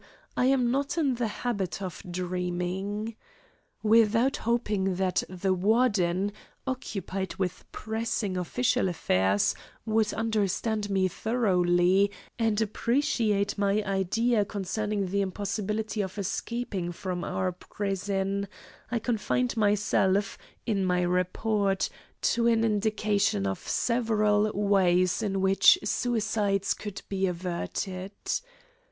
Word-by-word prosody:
I 250 - +2
am 255 -3 +3
not 280 +4 -1
in 290 -5 +2
the 240 -1 -1
habit 200 -5 -3
of 185 -5 -6
dreaming. 180 +4 -3 0.7
Without 225 +4 +4
hoping 210 -5 0
that 185 0 +1
the 185 +1 0
Warden, 200 -2 +2 0.3
occupied 195 -7 -4
with 185 -2 -4
pressing 220 -3 -2
official 245 +4 +1
affairs, 95 - +2 0.3
would 220 -1 +2
understand 220 -1 0
me 190 -1 +2
thoroughly 185 -3 +2 0.3
and 220 -2 +2
appreciate 220 -3 +1
my 200 +1 +2
idea 205 +4 +1
concerning 205 +1 -2
the 200 +2 0
impossibility 210 +3 -2
of 190 0 -5
escaping 200 -2 -3
from 180 0 -4
our 185 -1 -1
prison, 195 +1 -2 0.4
I 240 - 0
confined 245 +2 0
myself, 205 -2 +2 0.3
in 205 -5 0
my 180 -1 +2
report, 195 +3 +1 0.4
to 235 0 +2
an 225 -1 +3
indication 210 - +1
of 95 -1 -1
several 215 -3 +2
ways 190 -2 +2
in 195 -3 -1
which 195 - +6
suicides 210 -4 0
could 205 -2 -7
be 195 -1 0
averted. 185 +2 -4
205 Hz, 110 wpm, -28 LUFS, 185-220 Hz, 0.7 s, which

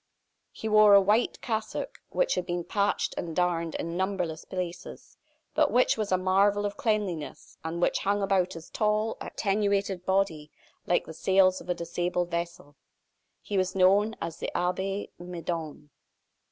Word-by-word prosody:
He 220 - -6
wore 215 -1 +7
a - - +9
white 210 +5 +2
cassock, 225 - -3
which - - +1
had - - -2
been 175 -1 -2
patched 200 +2 0
and 165 -2 -5
darned 170 -2 0
in 170 0 -4
numberless 180 -4 -2
places, 180 -2 -6 0.4
but - - +3
which 250 - +3
was 215 -3 -3
a 185 - +4
marvel 200 +2 +2
of 205 - -3
cleanliness, 205 - -2
and 165 +1 -4
which 175 - +2
hung 200 +1 0
about 190 -2 +1
his 165 0 -10
tall, 215 +1 +1
attenuated 200 -2 0
body 190 -6 0 0.4
like 175 - +2
the 160 - -8
sails 190 +2 +3
of - - -13
a 180 - +1
disabled 175 +1 -2
vessel. 170 -4 -4 0.7
He 200 -2 -1
was 185 0 -1
known 200 +4 +4
as 165 -1 -5
the - - -3
Abbe 190 +3 -2
Midon. 165 -4 -5
185 Hz, 155 wpm, -28 LUFS, 170-205 Hz, 0.7 s, a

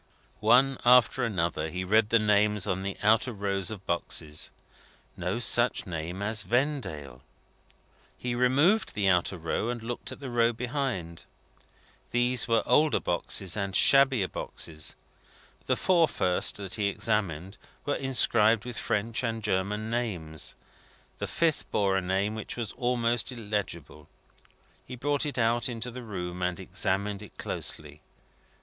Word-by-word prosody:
One 130 +5 +4
after 125 +1 +5
another, 85 -7 -1
he 90 +3 -4
read 105 +3 +3
the 115 - +5
names 105 -1 +2
on 95 -2 -1
the 100 0 -4
outer 110 +4 +3
rows 100 -3 -1
of 100 -4 -7
boxes. 80 -3 -2 0.7
No 90 +4 -2
such 120 +1 +4
name 90 +2 -5
as 110 0 0
Vendale! 110 - -2 1.0
He 125 -1 -3
removed 140 - +2
the 100 -2 +1
outer 90 0 +2
row, 85 +7 -2
and 120 -2 -4
looked 120 +1 -5
at - - -9
the 135 -3 -7
row 120 0 +2
behind. 120 - -4 0.8
These 120 0 +2
were 115 -1 +2
older 150 +5 +3
boxes, 90 +1 -2
and 100 -2 -3
shabbier 135 -7 +5
boxes. 80 -4 -4 0.7
The - - +2
four 170 -3 +3
first 90 -10 +1
that 100 -3 -6
he 105 -2 0
examined, 100 -3 -1 0.3
were 145 - 0
inscribed 115 -5 +3
with 125 -2 -5
French 115 +4 -1
and 115 -2 -3
German 105 +2 -1
names. 90 -11 -2 0.6
The - - -3
fifth 165 -3 0
bore 100 -2 +1
a 95 - +1
name 95 +3 -1
which 110 +2 -5
was 115 -3 -3
almost 120 -1 0
illegible. 100 - -5 0.7
He 125 - -9
brought 145 +4 0
it 145 - -5
out 120 +2 +2
into 120 +1 -4
the 125 +2 -8
room, 90 -5 -6
and 90 -1 -1
examined 100 +1 -1
it 105 - -13
closely. 75 0 -4
105 Hz, 145 wpm, -28 LUFS, 95-120 Hz, 1.0 s, after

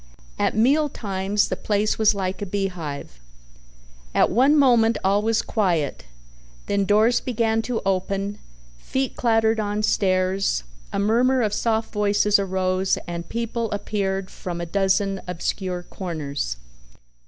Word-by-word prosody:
At - - +1
meal 285 +7 +3
times 200 -2 -1
the - - -1
place 210 +1 0
was 220 -1 +4
like 190 0 -3
a 205 - -3
beehive. 175 - -4 1.0
At - - +4
one 270 +8 +4
moment 235 -5 +4
all 200 +2 +3
was 225 +1 +1
quiet, 170 - -1 0.6
then 200 -1 0
doors 215 +4 +4
began 225 -2 0
to 235 0 -3
open, 195 +1 -1 0.4
feet 265 - -2
clattered 225 -1 +2
on 210 0 -1
stairs, 185 - +1 0.3
a - - -3
murmur 240 +5 +3
of 210 -1 0
soft 225 0 0
voices 210 0 +3
arose 190 -1 0
and 170 -1 -5
people 230 0 -2
appeared 195 -2 -2
from 175 -2 -6
a 170 - -3
dozen 195 +2 +1
obscure 180 +1 -3
corners. 145 - -4
200 Hz, 130 wpm, -23 LUFS, 185-225 Hz, 1.0 s, was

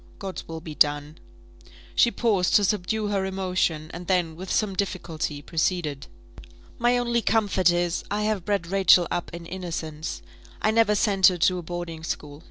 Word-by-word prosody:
God's 195 -2 -6
will 160 0 -6
be 155 -1 -7
done!" 145 +1 +1 0.7
She 235 - +5
paused 210 -7 +1
to 205 - +6
subdue 210 +2 0
her 200 -2 0
emotion, 185 -5 -1
and 175 +1 -8
then, 175 -4 +1
with 185 +2 -7
some 210 -3 0
difficulty, 165 -6 -3
proceeded. 160 -4 -1 0.7
"My 240 +1 +3
only 235 -1 +1
comfort 205 -5 +2
is, 175 0 0
I 210 +1 -1
have 210 -4 0
bred 200 -2 -1
Rachel 185 -1 +5
up 175 - -2
in 170 0 -8
innocence; 165 -3 -5 0.4
I 215 - +2
never 220 -2 +3
sent 195 -2 +4
her 180 - +2
to 180 +2 +2
a - - -5
boarding 170 -1 -6
school. 145 -3 -5
180 Hz, 170 wpm, -25 LUFS, 165-205 Hz, 0.7 s, to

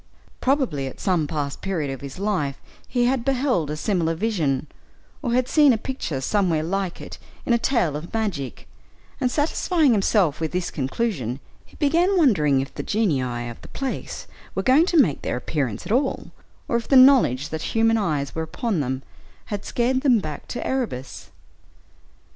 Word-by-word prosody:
Probably 255 - 0
at 130 - -9
some 175 -6 +1
past 145 -3 -3
period 165 -8 -2
of 135 - -6
his 140 +2 -8
life 185 -9 -1 0.3
he 245 -1 +1
had 250 -1 +1
beheld 250 - +1
a 150 - -3
similar 165 -1 0
vision, 160 - 0 0.6
or 245 -5 -1
had 250 0 +2
seen 295 -4 +5
a - - +1
picture 215 - -4
somewhere 175 -1 +1
like 185 +1 -2
it - - -9 0.3
in 240 - +2
a 235 - +3
tale 230 - +1
of 155 +3 -6
magic, 195 - -3 0.5
and 255 -3 +1
satisfying 305 +1 +2
himself 195 -7 +2
with 160 +1 -2
this 180 -1 -1
conclusion, 135 - -2 0.2
he - - -22
began 340 +6 +2
wondering 155 - +4
if 135 - -7
the - - -4
genii 130 - 0
of 120 - -9
the - - -12
place 270 -1 -5 0.3
were - - -1
going 280 +7 +5
to 345 - +2
make 180 - +4
their - - -2
appearance 125 -5 -3
at - - -5
all, 265 +3 0 0.4
or 235 - +1
if 235 - -5
the 275 - +3
knowledge 255 - +6
that 160 -1 -4
human 225 0 +2
eyes 150 -10 -1
were 160 - -3
upon 190 +4 -2
them 130 -1 -2 0.5
had 205 0 -3
scared 255 +2 0
them 260 -4 +4
back 155 -7 -5
to 245 - -5
Erebus. 125 - -3
195 Hz, 175 wpm, -23 LUFS, -, 0.6 s, knowledge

